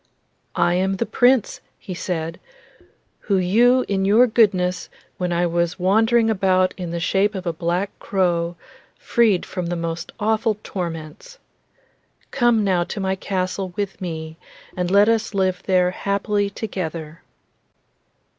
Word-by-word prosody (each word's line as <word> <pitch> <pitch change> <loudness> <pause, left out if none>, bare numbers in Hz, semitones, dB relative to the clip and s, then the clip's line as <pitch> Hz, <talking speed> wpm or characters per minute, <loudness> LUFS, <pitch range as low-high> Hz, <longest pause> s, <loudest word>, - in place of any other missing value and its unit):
'I 175 - +2
am 190 +2 +1
the 210 - -1
Prince,' 245 -1 +2 0.2
he 185 - -8
said, 165 -2 -4 0.8
'who 200 - 0
you 235 +8 +3
in 195 -1 0
your 215 +6 +5
goodness, 190 -6 +1 0.3
when 180 -1 -1
I 175 +1 +1
was 170 0 0
wandering 225 +5 +3
about 185 -3 +2
in 180 -3 -5
the 170 0 -3
shape 200 +4 +1
of 190 -1 -5
a 170 - -1
black 175 +4 -1
crow, 175 -3 0 0.4
freed 220 -6 +2
from 180 -2 -4
the 175 - -2
most 165 0 -4
awful 220 0 +1
torments. 170 - -6 0.9
Come 240 -4 +2
now 185 -3 +2
to 205 - -6
my 190 0 0
castle 185 -1 -3
with 200 -2 -4
me, 160 -2 -5 0.4
and 180 -1 -1
let 200 +2 +5
us 225 -2 0
live 185 -2 0
there 180 -1 +3
happily 200 +2 -1
together. 165 -7 -6
190 Hz, 140 wpm, -21 LUFS, 175-210 Hz, 0.9 s, your